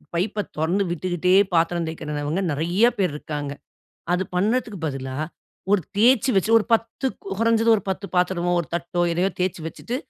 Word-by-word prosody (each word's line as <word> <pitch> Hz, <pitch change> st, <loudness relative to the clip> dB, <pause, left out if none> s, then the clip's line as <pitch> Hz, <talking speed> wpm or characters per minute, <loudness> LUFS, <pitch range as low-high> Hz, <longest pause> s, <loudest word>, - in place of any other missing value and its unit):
பைப்ப 205 Hz, +3 st, 0 dB
தொறந்து 175 Hz, +6 st, +1 dB
விட்டுக்குட்டே 180 Hz, +1 st, 0 dB, 0.2 s
பாத்திரம் 170 Hz, 0 st, +2 dB
தேய்க்கிறவங்க 150 Hz, +2 st, -3 dB
நெறைய 175 Hz, +9 st, +2 dB
பேர் 185 Hz, -7 st, +1 dB
இருக்காங்க. 145 Hz, -2 st, -5 dB, 0.6 s
அது 180 Hz, -, +1 dB
பண்ணதுக்கு 215 Hz, +1 st, 0 dB
பதிலா, 130 Hz, -2 st, -4 dB, 0.6 s
ஒரு 205 Hz, -, +4 dB, 0.2 s
தேய்ச்சு 245 Hz, +3 st, +4 dB
வச்சு 195 Hz, +3 st, +2 dB
ஒரு 215 Hz, -, -3 dB
10 230 Hz, +4 st, +1 dB, 0.3 s
கொறைஞ்சது 230 Hz, 0 st, +3 dB
ஒரு -, -, -4 dB
10 195 Hz, +1 st, -3 dB
பாத்திரமோ 175 Hz, -1 st, +1 dB
1 165 Hz, -, -6 dB
தட்டோ 170 Hz, +1 st, -2 dB
எதையோ 180 Hz, +3 st, +1 dB
தேய்ச்சு 180 Hz, -3 st, -1 dB
வச்சுட்ட்டு 240 Hz, +9 st, -5 dB
180 Hz, 150 wpm, -23 LUFS, 165-210 Hz, 0.6 s, ஒரு